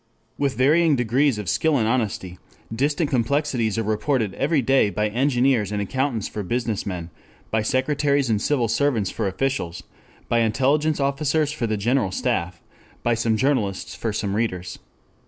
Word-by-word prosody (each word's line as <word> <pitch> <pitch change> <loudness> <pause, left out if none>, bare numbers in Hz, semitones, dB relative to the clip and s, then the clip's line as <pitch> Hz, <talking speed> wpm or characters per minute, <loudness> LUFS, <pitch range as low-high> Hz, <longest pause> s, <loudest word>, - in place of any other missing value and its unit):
With 140 -4 0
varying 155 +4 +4
degrees 125 +1 +2
of 105 -3 -5
skill 155 - +2
and 110 -3 +1
honesty 105 -7 -2 0.4
distant 145 +4 0
complexities 125 -3 0
are 115 - 0
reported 110 0 0
every 140 +2 +1
day 135 -3 +3
by 105 +2 -1
engineers 125 -3 +1
and 105 - -1
accountants 120 +2 -1
for 105 - -5
business 115 +1 -2
men, 90 -3 -5 0.4
by 110 - +2
secretaries 140 +4 +1
and 110 -3 +1
civil 130 -6 +1
servants 115 -3 +1
for 110 - -2
officials, 95 -5 -2 0.4
by 120 - +2
intelligence 140 +7 +1
officers 145 +2 +1
for 125 -6 -2
the 110 -1 -1
General 115 0 +1
Staff, 85 -1 -2 0.4
by 120 - +2
some 115 -1 +1
journalists 115 -7 0
for 115 - -3
some 100 -1 -2
readers. 95 -5 -2
120 Hz, 155 wpm, -23 LUFS, 105-140 Hz, 0.4 s, varying